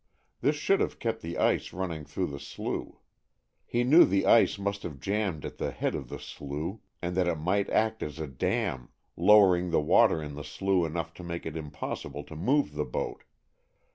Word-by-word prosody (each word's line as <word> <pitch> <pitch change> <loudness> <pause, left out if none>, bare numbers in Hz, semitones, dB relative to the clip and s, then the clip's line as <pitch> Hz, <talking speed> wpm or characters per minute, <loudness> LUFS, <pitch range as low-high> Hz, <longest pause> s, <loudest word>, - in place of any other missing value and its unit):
This 145 +2 +2
should 195 +6 +2
have - - -1
kept 115 -1 -2
the 85 +1 -5
ice - - +1
running 85 -5 -4
through - - -2
the 70 -1 -6
slough. - - -5 0.6
He 120 +1 +1
knew 150 +8 +8
the 95 +1 +2
ice 115 - +5
must 100 0 -2
have 75 -5 -7
jammed 95 -2 -1
at - - -7
the - - -1
head - - -2
of - - -5
the - - -5
slough, 75 +9 -6 0.2
and 90 0 -2
that 90 -1 +2
it 85 - +1
might 95 +6 0
act 110 0 +1
as 75 -1 -5
a 80 - -3
dam, 65 -2 -2 0.3
lowering 90 -1 +5
the - - +3
water 75 +1 +4
in 75 -2 -6
the 75 0 -7
slough 90 +3 0
enough 80 +1 -4
to 90 - -11
make 85 0 -5
it 80 - -5
impossible 75 -2 -5
to 80 - -11
move 130 - +1
the 75 0 -1
boat. 65 - -4
85 Hz, 200 wpm, -29 LUFS, 75-100 Hz, 0.6 s, knew